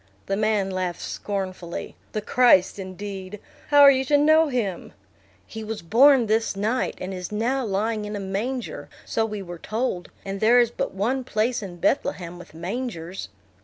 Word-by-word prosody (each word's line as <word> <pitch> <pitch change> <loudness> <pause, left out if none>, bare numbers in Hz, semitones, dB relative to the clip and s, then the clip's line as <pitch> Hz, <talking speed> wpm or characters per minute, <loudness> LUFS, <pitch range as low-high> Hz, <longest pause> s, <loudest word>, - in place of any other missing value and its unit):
The 195 - -1
man 210 -2 +1
laughed 185 -2 -3
scornfully. 185 -4 -5 0.2
"The 215 - -2
Christ 210 -6 +4
indeed! 195 +1 -7 0.3
How 290 -1 +6
are 280 -1 +10
you 265 -1 +1
to 290 +2 +4
know 310 +2 +5
him?" 225 -10 -3 0.5
"He 220 - -8
was 220 -3 -5
born 250 - +6
this 220 -1 +1
night, 220 +6 -1
and 185 +1 -5
is 180 +1 -6
now 240 +6 0
lying 215 +1 -1
in 210 0 -5
a - - -3
manger, 215 +7 -4 0.2
so 225 -1 0
we 210 -2 -5
were 175 -2 -8
told; 215 -5 -3 0.2
and 195 0 -4
there 235 +4 +5
is 240 -1 +3
but - - -3
one 245 +7 0
place 235 +1 0
in 185 -4 -7
Bethlehem 175 -6 -1
with 175 -3 -13
mangers." 180 - -5
210 Hz, 170 wpm, -24 LUFS, 190-245 Hz, 0.5 s, are